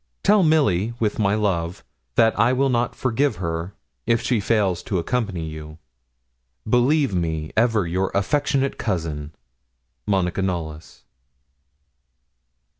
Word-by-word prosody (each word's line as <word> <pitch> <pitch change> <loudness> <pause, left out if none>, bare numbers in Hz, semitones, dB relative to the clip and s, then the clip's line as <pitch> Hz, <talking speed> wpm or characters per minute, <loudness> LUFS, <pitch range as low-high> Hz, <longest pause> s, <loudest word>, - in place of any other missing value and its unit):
Tell 205 0 +5
Milly 120 - +2
with 110 -1 -1
my 100 -1 +2
love 95 -3 -1 0.3
that 115 0 +4
I 115 +4 +4
will 135 +1 +2
not 120 -1 0
forgive 135 +3 0
her 85 +1 -4 0.3
if 115 0 +3
she 120 -1 0
fails 100 -4 +1
to 95 - -2
accompany 95 -2 -2
you. 75 0 -8 0.9
'Believe 125 +2 +3
me 80 -3 -2
ever 115 -3 +2
your 95 +3 -1
affectionate 135 +6 0
cousin, 80 -8 -3 0.8
'MONICA 95 -2 0
KNOLLYS.' 80 -4 -4
100 Hz, 115 wpm, -22 LUFS, 85-120 Hz, 0.9 s, Tell